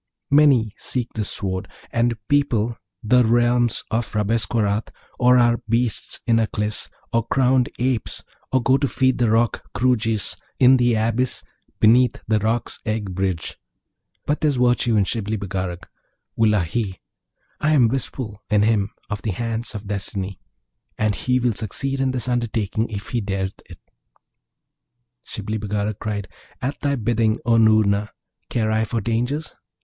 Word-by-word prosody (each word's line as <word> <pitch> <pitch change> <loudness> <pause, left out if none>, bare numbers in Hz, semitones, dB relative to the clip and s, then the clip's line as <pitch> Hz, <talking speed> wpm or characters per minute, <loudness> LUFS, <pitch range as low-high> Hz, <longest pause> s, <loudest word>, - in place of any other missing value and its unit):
Many 140 -7 +5
seek 125 -2 -3
this 105 -3 -1
Sword, 95 -1 -3 0.2
and 115 0 +1
people 120 -6 +1 0.3
the 125 +3 +4
realms 120 0 +2
of 115 +1 -1
Rabesqurat, 105 0 +1 0.3
or 125 0 +5
are 120 -1 +4
beasts 115 -1 -1
in 115 -2 +3
Aklis, 105 -1 -2 0.2
or 115 0 +1
crowned 130 -1 +3
Apes, 125 -2 -2 0.3
or 130 -2 +2
go 130 +2 +4
to 140 - +1
feed 130 -1 +1
the 120 -2 +3
Roc, 115 +1 +1
Kroojis, 115 -6 +1 0.2
in 130 0 +6
the 120 -2 +3
abyss 115 +3 0 0.4
beneath 120 +3 +4
the 110 -1 +2
Roc's 110 +3 -1
egg 110 -3 -2
bridge; 95 -2 -2 0.7
but 150 - -1
there's 150 -3 +2
virtue 120 -2 +2
in 105 - +4
Shibli 110 +1 -2
Bagarag: 95 -3 -4 0.5
wullahy! 105 -2 +1 0.6
I 155 +1 +2
am 130 -6 +5
wistful 115 -3 -4
in 105 -1 +3
him 105 -2 +2 0.2
of 105 -1 -4
the 110 - -3
hand 115 +3 -3
of 105 0 -6
Destiny, 100 -1 -3 0.6
and 105 -1 +1
he 125 +5 0
will 120 -2 +1
succeed 135 +7 -2
in 135 -1 +1
this 130 -1 0
undertaking 115 -2 -1
if 105 -1 -6
he 120 - -1
dareth 95 -1 -3
it.' - - -12 1.4
Shibli 110 +1 -4
Bagarag 105 0 -2
cried, 100 -2 -3 0.3
'At 135 +4 -4
thy 140 -1 +1
bidding, 115 -1 +1
O 115 -1 +4
Noorna! 110 -2 +3 0.4
Care 110 -2 0
I 110 0 +2
for 115 +1 -2
dangers? 120 +7 -2
115 Hz, 145 wpm, -22 LUFS, 105-125 Hz, 1.4 s, in